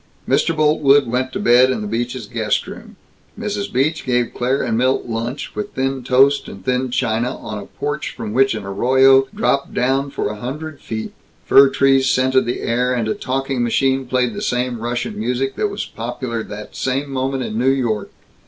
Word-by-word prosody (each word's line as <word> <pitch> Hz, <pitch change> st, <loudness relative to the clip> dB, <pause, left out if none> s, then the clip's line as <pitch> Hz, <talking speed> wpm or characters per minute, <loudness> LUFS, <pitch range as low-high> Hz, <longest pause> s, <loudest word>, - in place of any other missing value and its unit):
Mr. 165 Hz, -, +1 dB
Boltwood 145 Hz, -2 st, +4 dB
went 125 Hz, +2 st, -1 dB
to -, -, -4 dB
bed 125 Hz, +2 st, +5 dB
in 125 Hz, -4 st, -1 dB
the 105 Hz, -, -4 dB
Beaches' 120 Hz, +2 st, -3 dB
guest 110 Hz, 0 st, -1 dB
room. -, -, -10 dB, 0.4 s
Mrs. 210 Hz, -2 st, -3 dB
Beach 150 Hz, +5 st, 0 dB
gave 125 Hz, -2 st, 0 dB
Claire 130 Hz, +3 st, 0 dB
and 115 Hz, -, -1 dB
Milt 130 Hz, +3 st, +1 dB
lunch, 115 Hz, +4 st, -4 dB
with 210 Hz, -1 st, -5 dB
thin 135 Hz, 0 st, -1 dB
toast 135 Hz, +3 st, +3 dB
and 95 Hz, -1 st, -11 dB
thin 130 Hz, 0 st, 0 dB
china, 120 Hz, 0 st, -1 dB
on 110 Hz, -2 st, -6 dB
a 100 Hz, -, -9 dB
porch 145 Hz, +1 st, -4 dB
from 105 Hz, -2 st, -5 dB
which 135 Hz, -1 st, +3 dB
an 110 Hz, -, -5 dB
arroyo 130 Hz, +6 st, +4 dB
dropped 140 Hz, 0 st, -1 dB
down 135 Hz, +3 st, +1 dB
for -, -, -2 dB
a 105 Hz, -, -6 dB
hundred 145 Hz, +6 st, -6 dB
feet. 110 Hz, -1 st, -5 dB, 0.3 s
Fir 135 Hz, 0 st, +7 dB
trees 135 Hz, -1 st, +3 dB
scented 130 Hz, -1 st, +2 dB
the 120 Hz, -, -2 dB
air, 125 Hz, +2 st, 0 dB
and 115 Hz, -3 st, -1 dB
a 110 Hz, -, +1 dB
talking 135 Hz, 0 st, -2 dB
machine 130 Hz, +2 st, +1 dB
played 125 Hz, -2 st, 0 dB
the -, -, -5 dB
same 125 Hz, -1 st, -1 dB
Russian 120 Hz, -1 st, -3 dB
music 125 Hz, +4 st, -1 dB
that 210 Hz, -, 0 dB
was 200 Hz, 0 st, -4 dB
popular 115 Hz, 0 st, -4 dB
that 105 Hz, -1 st, -9 dB
same 135 Hz, +2 st, -2 dB
moment 135 Hz, 0 st, -1 dB
in 110 Hz, -1 st, -3 dB
New 130 Hz, +2 st, +3 dB
York. 120 Hz, -6 st, 0 dB
130 Hz, 190 wpm, -19 LUFS, 120-135 Hz, 0.4 s, Fir